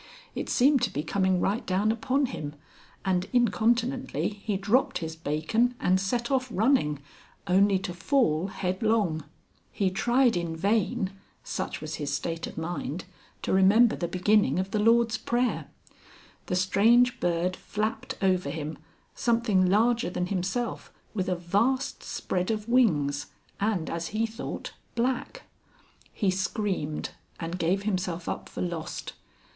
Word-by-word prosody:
It -, -, -4 dB
seemed 270 Hz, +1 st, +4 dB
to 245 Hz, -, +2 dB
be 150 Hz, -, -2 dB
coming 190 Hz, +2 st, +1 dB
right 205 Hz, +6 st, 0 dB
down 195 Hz, +4 st, +1 dB
upon 255 Hz, +5 st, +1 dB
him, 150 Hz, -, -5 dB, 0.5 s
and 185 Hz, -1 st, +1 dB
incontinently 240 Hz, +3 st, +1 dB
he 205 Hz, -1 st, -3 dB
dropped 255 Hz, +8 st, +2 dB
his 160 Hz, -2 st, -5 dB
bacon 165 Hz, +11 st, 0 dB
and 185 Hz, +1 st, +3 dB
set 235 Hz, +6 st, -1 dB
off 260 Hz, -1 st, +1 dB
running, 215 Hz, -, +2 dB, 0.5 s
only 195 Hz, +2 st, +4 dB
to 185 Hz, -1 st, -4 dB
fall 175 Hz, -, +1 dB
headlong. 190 Hz, -3 st, 0 dB, 0.5 s
He 195 Hz, -2 st, 0 dB
tried 240 Hz, +5 st, +3 dB
in 170 Hz, -2 st, -2 dB
vain 195 Hz, +1 st, +1 dB, 0.3 s
such -, -, -4 dB
was 155 Hz, -1 st, -5 dB
his 145 Hz, -2 st, -3 dB
state 165 Hz, +4 st, -2 dB
of -, -, -10 dB
mind 170 Hz, 0 st, -4 dB, 0.4 s
to -, -, 0 dB
remember 205 Hz, +5 st, +5 dB
the 170 Hz, -, -2 dB
beginning 185 Hz, -3 st, +2 dB
of 190 Hz, +1 st, -1 dB
the 215 Hz, -, 0 dB
Lord's 230 Hz, 0 st, +3 dB
Prayer. 245 Hz, +1 st, 0 dB, 0.8 s
The 180 Hz, -, 0 dB
strange 230 Hz, +7 st, +4 dB
bird 175 Hz, +1 st, 0 dB
flapped 215 Hz, +3 st, -3 dB
over 185 Hz, -5 st, +2 dB
him, 155 Hz, 0 st, -5 dB, 0.3 s
something 230 Hz, -6 st, +2 dB
larger 230 Hz, +3 st, +3 dB
than 180 Hz, 0 st, -2 dB
himself, 195 Hz, +6 st, -2 dB, 0.2 s
with 190 Hz, -3 st, -1 dB
a 180 Hz, -, +1 dB
vast 230 Hz, +11 st, 0 dB
spread 180 Hz, -1 st, -2 dB
of 215 Hz, -1 st, -2 dB
wings, 150 Hz, -, +2 dB, 0.3 s
and, 200 Hz, -5 st, 0 dB
as 170 Hz, 0 st, -3 dB
he 220 Hz, +2 st, 0 dB
thought, 225 Hz, +1 st, -6 dB, 0.2 s
black. 255 Hz, -, -1 dB, 0.7 s
He 200 Hz, -4 st, +1 dB
screamed 190 Hz, -5 st, -2 dB, 0.3 s
and 170 Hz, +2 st, -4 dB
gave 190 Hz, +4 st, +1 dB
himself 180 Hz, -4 st, -2 dB
up -, -, -4 dB
for -, -, -4 dB
lost. 170 Hz, -3 st, -4 dB
195 Hz, 140 wpm, -27 LUFS, 175-230 Hz, 0.8 s, remember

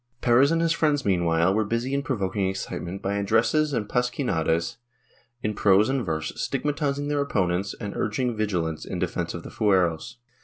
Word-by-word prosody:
Perez 125 Hz, +3 st, +5 dB
and 165 Hz, 0 st, +1 dB
his 165 Hz, -, +2 dB
friends 150 Hz, -2 st, +1 dB
meanwhile 85 Hz, -2 st, +2 dB
were 110 Hz, +2 st, +2 dB
busy 115 Hz, +5 st, -2 dB
in 140 Hz, -, +1 dB
provoking 100 Hz, -7 st, -1 dB
excite 95 Hz, 0 st, -4 dB
ment 90 Hz, +3 st, -6 dB
by 100 Hz, +1 st, -1 dB
addresses 115 Hz, +9 st, +2 dB
and 110 Hz, -6 st, -1 dB
pasquinades 120 Hz, -, 0 dB, 0.7 s
in 105 Hz, -, 0 dB
prose 100 Hz, +1 st, +4 dB
and 135 Hz, -2 st, 0 dB
verse, 80 Hz, -3 st, -2 dB
stigmatiz 145 Hz, -1 st, -1 dB
ing 145 Hz, 0 st, -3 dB
their 145 Hz, -1 st, 0 dB
opponents 95 Hz, -7 st, 0 dB
and 100 Hz, -3 st, -5 dB
urging 120 Hz, +3 st, -1 dB
vigilance 90 Hz, -7 st, -1 dB
in 95 Hz, -, -5 dB
defence 85 Hz, -1 st, -2 dB
of 85 Hz, -, -7 dB
the -, -, -9 dB
fueros. 95 Hz, -6 st, +1 dB
105 Hz, 180 wpm, -25 LUFS, 90-135 Hz, 0.7 s, Perez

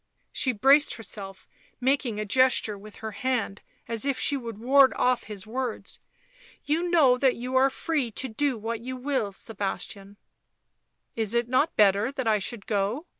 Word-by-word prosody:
She 260 Hz, -, 0 dB
braced 275 Hz, +7 st, +4 dB
herself, 195 Hz, -3 st, -9 dB, 0.3 s
making 255 Hz, -4 st, 0 dB
a 215 Hz, -, -2 dB
gesture 255 Hz, -1 st, +3 dB
with 205 Hz, +1 st, -12 dB
her 220 Hz, -, -3 dB
hand 230 Hz, -3 st, -2 dB, 0.3 s
as 230 Hz, -1 st, -1 dB
if 275 Hz, -2 st, 0 dB
she 285 Hz, -, +2 dB
would 230 Hz, -5 st, -6 dB
ward 265 Hz, +4 st, +5 dB
off 250 Hz, -1 st, +1 dB
his 205 Hz, -3 st, -7 dB
words. 245 Hz, +1 st, -5 dB, 0.3 s
" -, -, -26 dB
You 330 Hz, +4 st, 0 dB
know 275 Hz, -8 st, +4 dB
that 265 Hz, -2 st, +3 dB
you 250 Hz, +2 st, -5 dB
are 265 Hz, +1 st, +5 dB
free 285 Hz, -2 st, -2 dB
to 265 Hz, -, -3 dB
do 260 Hz, +2 st, -1 dB
what 225 Hz, +1 st, -4 dB
you 255 Hz, +2 st, -6 dB
will, 255 Hz, -5 st, -1 dB
Sebastian 200 Hz, -1 st, -5 dB, 0.3 s
" -, -, -52 dB
" -, -, -51 dB
Is 225 Hz, 0 st, -1 dB
it 235 Hz, 0 st, +1 dB
not 260 Hz, +6 st, +1 dB
better 205 Hz, +3 st, +3 dB
that 260 Hz, -4 st, -3 dB
I 215 Hz, -1 st, +3 dB
should 200 Hz, +2 st, -4 dB
go 210 Hz, -, -1 dB
240 Hz, 180 wpm, -26 LUFS, 210-265 Hz, 0.3 s, ward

